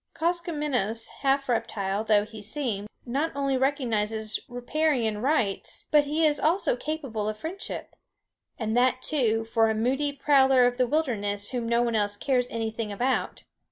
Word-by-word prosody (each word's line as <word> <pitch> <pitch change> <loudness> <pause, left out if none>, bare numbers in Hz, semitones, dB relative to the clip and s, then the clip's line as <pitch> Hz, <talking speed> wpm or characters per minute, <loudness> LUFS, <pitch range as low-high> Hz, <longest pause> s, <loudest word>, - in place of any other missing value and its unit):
Koskomenos, 300 - -1
half 275 0 +1
reptile 215 -4 -1
though 210 -2 +3
he 215 0 -10
seem, 215 -3 -2 0.2
not 280 +6 -1
only 275 -1 0
recognizes 225 -5 0
riparian 245 -3 0
rights, 245 -8 -1
but 295 -1 +5
he 310 +3 +1
is 295 -1 +3
also 335 -1 +2
capable 250 -7 -3
of 215 - -5
friendship 340 - -5 0.6
and 220 -1 -2
that, 255 +1 +2
too, 225 -7 +1
for 225 0 +2
a 220 - 0
moody 265 +6 0
prowler 270 -2 +4
of 245 0 +1
the 250 - +3
wilderness 205 -9 -1
whom 240 -3 -2
no 235 0 +3
one 235 -1 0
else 205 -1 +1
cares 250 +1 +1
anything 225 -1 -3
about. 250 +6 -1
245 Hz, 155 wpm, -27 LUFS, 220-285 Hz, 0.6 s, but